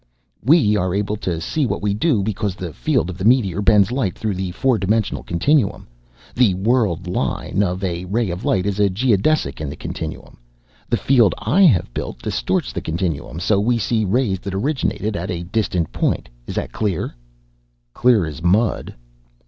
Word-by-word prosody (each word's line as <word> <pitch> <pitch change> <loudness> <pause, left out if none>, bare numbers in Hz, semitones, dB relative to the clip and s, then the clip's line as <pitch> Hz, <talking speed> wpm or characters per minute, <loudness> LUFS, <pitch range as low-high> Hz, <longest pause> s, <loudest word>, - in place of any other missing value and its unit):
"We 135 -7 +4
are 95 -2 0
able 105 +1 -1
to 90 -6 -3
see 135 - -1
what - - -3
we 105 -1 +1
do 110 -1 +1
because 105 -2 -2
the 90 -5 -6
field 70 +8 0
of 95 - -10
the - - -3
meteor 105 -5 +3
bends 105 0 +4
light 125 -8 -1
through 110 -2 -2
the 95 0 -3
four 120 +5 +1
dimensional 105 +2 0
continuum. 105 - +1 0.5
The 115 -7 +3
world 100 -3 +1
line 90 +2 -1
of 95 -1 -1
a 90 -1 -2
ray 105 +1 -1
of 90 +2 -5
light 95 -1 +1
is 100 0 -1
a 100 -1 +4
geodesic 105 - +1
in 75 - -3
the 70 - -6
continuum. - - -7 0.5
The - - +2
field 120 -8 +3
I 195 - +1
have 95 - +3
built - - -4
distorts - - -1
the - - -3
continuum, 80 -1 -3
so 100 +3 +2
we 120 +4 +2
see 110 +1 0
rays 105 -1 +1
that 95 +1 -5
originated 110 -3 -1
at 85 +2 -4
a 85 -1 -3
distant 90 -3 -1
point. - - -1 0.2
Is - - -5
that - - -3
clear?" 100 -7 -2 0.8
"Clear 120 -7 +3
as 75 -1 -7
mud!" 100 +7 +1
100 Hz, 180 wpm, -20 LUFS, 90-115 Hz, 0.8 s, We